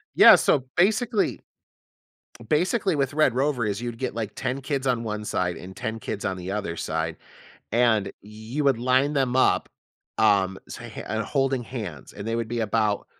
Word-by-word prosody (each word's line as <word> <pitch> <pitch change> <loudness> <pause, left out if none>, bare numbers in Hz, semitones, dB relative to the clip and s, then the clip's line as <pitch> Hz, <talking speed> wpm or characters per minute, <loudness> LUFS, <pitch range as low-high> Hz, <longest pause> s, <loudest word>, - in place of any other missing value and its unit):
Yeah, - - +10
so 135 -3 +2
basically 215 +3 +2 1.1
basically 185 +3 +2
with 140 -1 0
red 155 -6 +3
rover 135 -4 +1
is 105 +2 -2
you'd 120 -1 -5
get, 130 - -3
like, 110 -3 -3
10 130 +1 -3
kids 135 -1 -2
on 120 -2 +1
1 105 -1 -4
side, 90 -4 -1
and 95 +1 -10
10 110 0 -4
kids 105 -2 -5
on 95 -2 -1
the 90 +1 -5
other 100 -5 -3
side, 80 0 -3 0.5
and 110 -4 +2
you 110 +7 -5
would 135 -4 +3
line 130 +4 +2
them 130 -3 +1
up, 130 - +3 0.5
um, 95 -3 +3
so - - -8
h - - -9
and 110 0 -2
holding 135 0 0
hands 105 - -7
and 105 +2 -7
they 115 - -1
would 115 -1 -2
be 120 +1 -3
about 105 -1 0
115 Hz, 180 wpm, -25 LUFS, 105-135 Hz, 1.1 s, Yeah